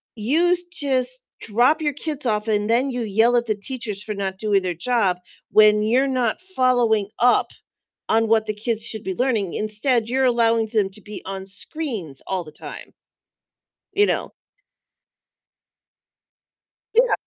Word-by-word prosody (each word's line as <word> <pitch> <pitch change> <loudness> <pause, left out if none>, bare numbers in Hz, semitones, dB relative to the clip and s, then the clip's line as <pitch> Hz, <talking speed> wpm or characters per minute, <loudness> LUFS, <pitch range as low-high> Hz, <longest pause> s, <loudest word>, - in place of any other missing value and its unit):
you 325 +11 +2
just 255 -5 0 0.2
drop 240 +8 +2
your 295 -2 0
kids 295 -1 -5
off, 215 -2 0
and 210 -1 +1
then 250 +4 +2
you 245 -1 -3
yell 225 +3 +3
at 240 - +1
the 215 - +1
teachers 210 -1 -6
for 210 -1 -5
not 190 -1 -3
doing 205 -3 +1
their 180 -1 -1
job 195 -1 +1 0.3
when 210 0 +6
you're 250 +5 +2
not 250 +1 0
following 245 - +1
up 245 +1 +3 0.6
on 225 0 +3
what 220 0 +3
the 215 - -1
kids 220 +1 -3
should 220 -2 -7
be 190 - -3
learning. 225 -8 0
Instead, 220 +2 +1
you're 265 +1 +2
allowing 230 -2 +3
them 215 -3 +1
to 195 +2 -14
be 210 +1 -9
on 190 0 -5
screens 200 - -4
all 190 -2 -2
the 155 - -12
time." - - -10 1.0
You 410 +1 +4
know? - - -2 2.6
Yeah. 480 +2 +4
225 Hz, 155 wpm, -22 LUFS, 210-255 Hz, 2.6 s, when